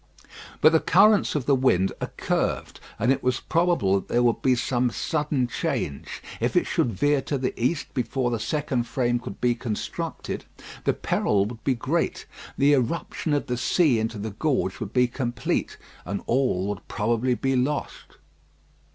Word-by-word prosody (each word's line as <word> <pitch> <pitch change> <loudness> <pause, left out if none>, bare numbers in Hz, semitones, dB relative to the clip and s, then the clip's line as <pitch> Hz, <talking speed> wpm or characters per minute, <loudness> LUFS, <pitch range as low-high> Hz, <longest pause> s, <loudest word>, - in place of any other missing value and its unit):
But 155 - +7
the 160 - +5
currents 200 +3 +4
of 140 -5 -1
the 140 - +3
wind 125 -8 +3
are - - -2
curved, - - -1 0.2
and 115 +5 +2
it 135 - +1
was 125 0 0
probable 165 - +2
that - - -12
there 120 +1 +2
would 120 -1 +2
be 130 -1 +3
some 125 0 0
sudden 145 +1 -1
change. 70 - -3 0.2
If - - -1
it - - +4
should 120 - 0
veer 145 +8 +2
to 140 - -2
the 130 -1 -2
east 140 +4 -1
before 125 0 -1
the 115 - -1
second 125 0 -1
frame 120 0 0
could 100 -5 -8
be 125 -1 +2
constructed 115 -2 -4 0.4
the - - +3
peril 100 -1 +1
would 115 +1 -8
be 135 - +1
great. 145 +8 -1 0.3
The 140 +2 +5
irruption 150 +4 -1
of 145 - -1
the 125 - -2
sea 135 -1 +3
into 110 0 -2
the 105 +1 -4
gorge 125 -4 -1
would 105 -2 -5
be 125 0 +3
complete, 120 -1 -2 0.3
and 100 - -4
all 120 -7 +1
would 105 -2 -6
probably 120 +3 0
be 135 +2 0
lost. 135 +4 -2
125 Hz, 175 wpm, -25 LUFS, 115-140 Hz, 0.4 s, But